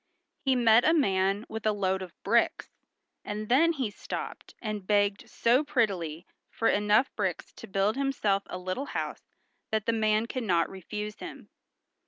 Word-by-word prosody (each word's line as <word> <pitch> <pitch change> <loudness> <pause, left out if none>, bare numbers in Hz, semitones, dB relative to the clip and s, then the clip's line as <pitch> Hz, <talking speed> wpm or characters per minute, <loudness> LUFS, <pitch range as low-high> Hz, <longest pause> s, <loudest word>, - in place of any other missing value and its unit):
He 265 -1 +3
met 235 -1 +5
a 320 - +4
man 195 - +2
with 220 -1 -6
a 215 - +3
load 190 -2 0
of 180 -2 -8
bricks, - - +2 0.5
and 210 +1 -5
then 325 +7 +5
he 260 -8 -2
stopped - - -7
and 210 -4 -5
begged 205 -1 +1
so 245 +5 +3
prettily 185 - -1 0.2
for 225 - 0
enough 210 +5 +3
bricks - - -2
to 230 - -11
build 195 +2 +1
himself 245 -8 +1
a - - -5
little 185 +9 -3
house - - -5 0.4
that 220 -2 -1
the 230 - +2
man 215 0 +2
could 255 +2 -4
not 175 -6 +1
refuse 210 +3 -6
him. - - -9
210 Hz, 165 wpm, -28 LUFS, 195-235 Hz, 0.5 s, met